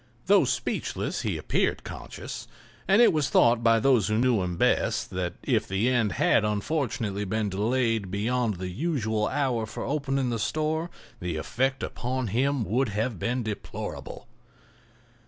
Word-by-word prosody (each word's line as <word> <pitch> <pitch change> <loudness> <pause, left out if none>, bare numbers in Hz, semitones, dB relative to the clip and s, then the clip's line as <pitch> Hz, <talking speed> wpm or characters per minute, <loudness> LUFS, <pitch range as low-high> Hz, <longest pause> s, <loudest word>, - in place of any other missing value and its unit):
Though 200 +1 +5
speechless, - - -2
he - - -1
appeared - - 0
conscious, - - -7 0.4
and 200 +5 +6
it 235 - +5
was 150 -3 +1
thought 115 0 +4
by 115 -1 +4
those 120 -4 +3
who 105 - +1
knew 120 -3 +3
him 90 -1 -3
best - - +1
that 90 -1 -2
if - - +1
the 100 +6 +1
end 120 -4 +1
had 150 -6 +3
unfortunately 105 -2 -1
been 105 +1 -1
delayed 110 +1 0
beyond 110 +3 0
the 90 +1 -5
usual 110 - -1
hour 125 -6 0
for - - -6
opening 135 -2 -1
the 115 - -2
store 155 - -1 0.3
the 85 -2 -3
effect 130 - -1
upon 125 -1 -3
him 130 +4 +1
would 125 +4 0
have 110 0 -2
been 125 +5 -1
deplorable. 110 +2 -6
115 Hz, 155 wpm, -27 LUFS, 105-135 Hz, 0.4 s, and